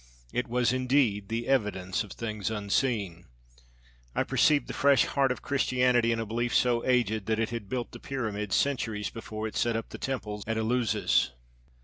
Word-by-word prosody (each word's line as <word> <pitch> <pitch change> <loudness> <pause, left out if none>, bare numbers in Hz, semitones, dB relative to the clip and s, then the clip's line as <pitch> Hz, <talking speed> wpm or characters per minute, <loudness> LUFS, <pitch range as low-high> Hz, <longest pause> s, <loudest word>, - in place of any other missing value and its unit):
It 125 - -1
was, 120 +1 +1
indeed, 125 -6 +1
the 115 +1 -2
evidence 105 -8 0
of 105 - -12
things 110 -3 -3
unseen! 100 -4 -1 0.9
I - - +2
perceived 150 -2 +3
the - - -5
fresh 140 -1 +4
heart 135 -2 +1
of 125 - -4
Christianity 125 -3 +2
in 115 - 0
a 115 - -2
belief 120 +2 -1
so 120 -1 +3
aged 110 -5 +1
that 110 0 +1
it 115 +1 -1
had 115 -4 -5
built 125 0 -3
the - - -10
pyramids 105 -7 -3
centuries 115 -7 0
before 110 -1 -6
it 110 - -8
set 120 -1 +1
up 115 - -3
the - - -8
temples 105 -6 -4
at 115 0 -1
Eleusis. 110 - +1
115 Hz, 180 wpm, -28 LUFS, 105-125 Hz, 0.9 s, fresh